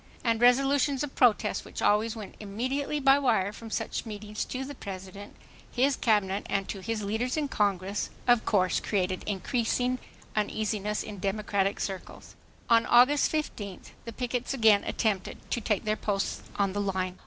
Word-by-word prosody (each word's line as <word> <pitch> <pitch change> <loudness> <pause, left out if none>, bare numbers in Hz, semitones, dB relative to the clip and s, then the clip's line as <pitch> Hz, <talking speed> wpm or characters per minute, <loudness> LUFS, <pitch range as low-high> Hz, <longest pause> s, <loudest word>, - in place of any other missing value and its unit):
And 230 -1 +1
resolutions 275 +3 +4
of 290 - -5
protest 240 -4 +3
which - - -9
always 215 +2 +2
went 215 -3 -8
immediately 260 +8 -2
by 275 0 +5
wire 220 -7 +1
from 225 +1 -9
such - - -2
meetings 210 -1 -5
to 260 +1 -4
the 285 - -7
President, 195 -3 -8 0.4
his 265 +2 +2
cabinet 205 -3 +1
and 195 -1 0
to 200 - -4
his 220 +2 -3
leaders 225 +7 -1
in 300 -2 0
Congress, 200 -4 0 0.2
of 245 -2 +5
course 185 -3 +2
created 185 -2 -1
increasing 245 +5 0 0.4
uneasiness 210 0 -1
in 205 -2 -8
Democratic 200 0 0
circles. 190 -2 -6 0.3
On 230 0 +4
August 255 +4 +5
15th 210 - -4
the 230 - -5
pickets 245 +2 -2
again 220 -5 +5
attempted 205 -5 -1
to 240 - 0
take 210 -2 0
their 215 0 +1
posts 200 -2 -2 0.2
on 200 -2 +1
the 205 - -1
line. 185 -2 -2
215 Hz, 160 wpm, -28 LUFS, 200-245 Hz, 0.4 s, by